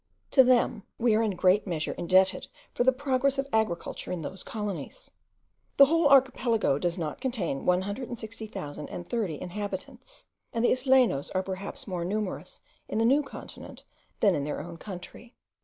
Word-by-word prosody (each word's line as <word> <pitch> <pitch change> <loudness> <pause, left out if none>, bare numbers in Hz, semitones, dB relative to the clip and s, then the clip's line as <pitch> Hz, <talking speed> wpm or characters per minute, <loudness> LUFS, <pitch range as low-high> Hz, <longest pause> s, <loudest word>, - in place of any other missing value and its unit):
To 265 - +7
them 245 -3 +3 0.2
we 235 -1 +3
are 220 - +3
in 220 -2 +1
a - - -9
great 185 +4 +3
measure 160 -4 -2
indebted 185 +2 +2 0.3
for - - +1
the 260 - +5
progress 270 0 0
of 275 0 -1
agriculture 215 -6 -1
in 175 -3 -3
those 185 +5 -6
colonies. 210 - -6 0.7
The 275 - +10
whole 330 +2 +3
archipelago 240 - +3
does 175 +1 -1
not 160 +2 -4
contain 220 - -2
160,030 205 - -3
inhabitants, 205 +7 -7 0.3
and 230 +1 +1
the - - +4
Islenos 255 - +3
are 185 - +1
perhaps 190 +1 -6
more 180 -4 -3
numerous 205 +2 -4 0.3
in - - -3
the 225 - +3
new 275 +5 +5
continent 280 - -10 0.4
than 200 -4 +5
in 145 - -1
their 150 - -3
own 170 0 -8
country. 205 +6 -9
210 Hz, 155 wpm, -28 LUFS, 180-250 Hz, 0.7 s, The